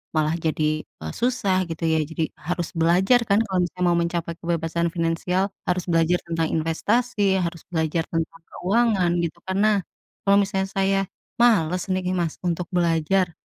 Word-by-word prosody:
malah 155 +1 +2
jadi, 155 -1 0
eee, 80 0 -9
susah 200 -7 +1
gitu 165 0 -5
ya 160 -1 +2
jadi 160 +1 -3
harus 175 +1 -3
belajar 180 +9 +4
kan 200 +1 +4
kalau 190 -2 -1
misalnya 180 +1 -3
mau 170 - +3
mencapai 170 -1 -2
kebebasan 170 0 -1
finansial, 180 +3 0 0.2
harus 180 0 0
belajar 165 +1 +3
tentang 165 -1 0
investasi, 200 +5 +1
harus 170 -1 -3
belajar 160 0 0
tentang 165 0 -3
keuangan 195 -2 +2
gitu 170 +1 -4
karena, 200 +1 +2 0.4
kalau 200 0 +5
misalnya 195 -1 -1
saya, 195 0 +1 0.4
males 180 -7 +3
nih 185 0 0
Mas 170 -3 -1
untuk 175 0 -1
belajar, 170 +1 +2
175 Hz, 150 wpm, -23 LUFS, 165-195 Hz, 0.4 s, kalau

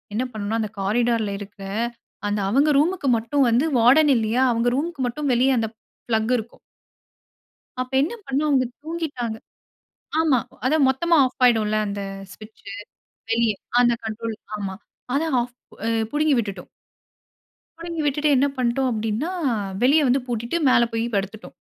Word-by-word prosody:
என்ன 245 - +1
பண்ணனும்னா 215 +1 -2
அந்த 215 -1 -4
காரிடார்ல 225 +1 +1
இருக்க, 205 0 -11 0.7
அந்த 205 0 -1
அவங்க 280 +7 +3
ரூமுக்கு 325 -2 0
மட்டும் 265 +4 +1
வந்து 245 +7 +3
வார்டன் 275 +6 +6
இல்லியா? 225 +3 +1
அவங்க 230 +1 +1
ரூம்க்கு 315 -2 -3
மட்டும் 280 +2 -2
வெளிய 255 +3 +3
அந்த 225 -1 -1 0.4
ப்ளக் 220 +1 +1
இருக்கும். 225 +1 -8 1.2
அப்ப 255 +1 -3
என்ன 350 +11 -2
பண்ணோம், 285 +3 0
அவங்க 260 -2 +3 0.2
தூங்கிட்டாங்க. 300 -9 -4 0.8
ஆமா 305 -6 +3 0.3
அத 300 +4 +3
மொத்தமா 335 +6 +2
ஆஃப் 255 - -6
ஆயிடும்ல 215 -3 +3
அந்த 200 0 -4 0.3
ஸ்விட்ச். 215 +2 -15 0.7
வெளிய 230 -1 +2 0.3
அந்த 240 -1 +4
கண்ட்ரோல 220 +1 -4 0.2
ஆமா. 195 -2 -4 0.4
அத 290 - +2 0.2
ஆஃப் 245 +1 -5 0.6
புடுங்கி 300 -1 +2
விட்டுவிட்டோம். 205 -4 -3 1.1
புடுங்கி 335 -1 -5
விட்டுவிட்டு 290 0 +2
என்ன 275 +2 +3
பண்ணிட்டோம் 255 +1 +1
அப்டின்னா, 225 +9 -2 0.5
வெளிய 285 +3 +5
வந்து 255 0 +2
பூட்டிட்டு 235 +7 -2
மேல 235 -1 +4
போய் 225 +1 0
படுத்துட்டோம். 200 +3 -5
245 Hz, 140 wpm, -23 LUFS, 220-285 Hz, 1.2 s, வார்டன்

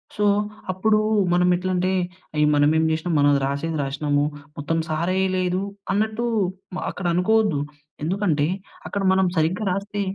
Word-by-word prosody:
So, 210 - +1 0.5
అప్పుడు 215 +3 +2 0.3
మనం 180 0 +3
ఎట్లా 185 +1 -2
అంటే, 185 +1 +1 0.5
ఏ! - - +4
మనమేం 155 +2 +3
చేసినాం 160 +2 -1
మనం 145 0 +5
రాసేది 150 +4 -2
రాసినాము. 145 +1 0 0.3
మొత్తం 165 +3 -1
సారెయ్యలేదు 185 +3 0 0.3
అన్నట్టు 220 +3 0 0.5
మ - - -3
అక్కడ 180 - -7
అనుకోవద్దు. 205 -4 +2 0.5
ఎందుకంటే 170 -5 +1 0.4
అక్కడ 200 - -3
మనం 190 -1 +3
సరిగ్గా 170 +6 +1
రాస్తే 200 +2 -3
180 Hz, 130 wpm, -23 LUFS, 155-195 Hz, 0.5 s, మనం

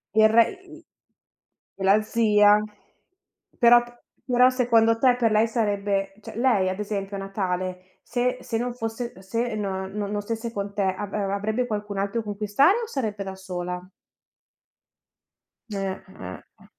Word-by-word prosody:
Il 220 0 +6
re 230 +1 +6 0.2
i 325 +1 -14 0.9
e 195 - -6
la 195 +2 +5
zia, 210 -2 +4 1.0
però 240 -1 +7
p 240 0 -17 0.2
però 250 0 +5
secondo 230 -3 +3
te 250 -2 +5
per 230 -3 +2
lei 215 +1 +4
sarebbe, 200 -3 -1
cioè 210 - -10
lei 225 -7 +3
ad 190 +2 -4
esempio 200 -1 -3
a - - -5
Natale 185 -2 -4
se 250 +1 -1
se 225 - -3
non 245 +1 -2
fosse, 225 -3 -5
se 230 +4 -2
no 190 -2 -3
non 205 +1 -3
stesse 230 +2 -4
con 200 0 -4
te 200 -1 0
avr 195 +1 -2
avrebbe 220 +5 -1
qualcun 210 -2 -4
altro 200 +4 -1
con 205 -1 -6
cui 210 - -3
stare 280 - +4
o - - -5
sarebbe 215 - -3
da 190 0 -6
sola? 180 -1 -5 1.9
Eh, - - -4 0.4
eh, 90 0 -8 0.2
eh. - - -18
210 Hz, 155 wpm, -25 LUFS, 195-235 Hz, 1.9 s, però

